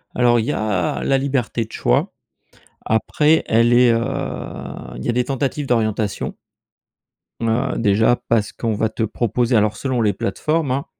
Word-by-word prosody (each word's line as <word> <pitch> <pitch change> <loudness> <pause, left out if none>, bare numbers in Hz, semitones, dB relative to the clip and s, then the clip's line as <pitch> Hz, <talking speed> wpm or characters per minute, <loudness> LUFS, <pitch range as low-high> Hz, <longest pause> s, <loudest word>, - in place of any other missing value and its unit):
Alors, 120 -1 +4
il 110 - -1
y 145 - -1
a 100 -5 -1
la 135 - +2
liberté 130 -4 -1
de 115 - -19
choix. - - 0 0.7
Après, 150 +8 +2
elle 115 +2 +3
est, 120 -1 +6
heu, 115 - +2 1.0
il 65 - -7
y - - -1
a - - +4
des 125 +1 0
tentatives 135 +1 -2
d'orientation 110 -3 -1 1.1
heu, 120 +4 0
déjà 110 +2 +3
parce 110 -3 +1
qu'on 115 -2 -2
va 110 +1 0
te 110 - -3
proposer, 120 +2 0
alors, 105 0 +2
selon 130 -3 -1
les 105 -3 +2
plateformes, 150 - -1
hein, 135 +2 -1
115 Hz, 165 wpm, -20 LUFS, 110-130 Hz, 1.1 s, est